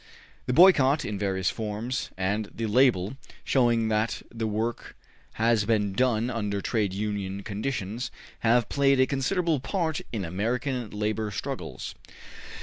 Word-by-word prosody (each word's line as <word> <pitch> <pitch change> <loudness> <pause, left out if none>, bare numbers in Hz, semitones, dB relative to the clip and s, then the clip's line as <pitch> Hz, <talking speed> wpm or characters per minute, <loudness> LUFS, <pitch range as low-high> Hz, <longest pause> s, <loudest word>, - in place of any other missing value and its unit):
The 125 - +1
boycott, 150 -4 +6
in 105 -2 -3
various 95 -2 0
forms, 110 +4 -3
and 100 +3 -1
the 115 - -4
label, 110 -1 +3 0.3
showing 120 -4 +2
that 110 +1 0
the 115 -1 -2
work 110 +2 -3 0.4
has 115 -1 +2
been 105 -2 +1
done 120 +1 +1
under 105 -4 -2
trade 105 -1 0
union 100 -1 -3
conditions, 110 +1 -3 0.3
have 120 +1 +3
played 140 -1 +3
a 130 - +6
considerable 150 +4 0
part 160 +1 -1
in 105 -5 -3
American 120 - -2
labor 105 +1 -2
struggles. 100 - -5
115 Hz, 135 wpm, -27 LUFS, 105-125 Hz, 0.4 s, boycott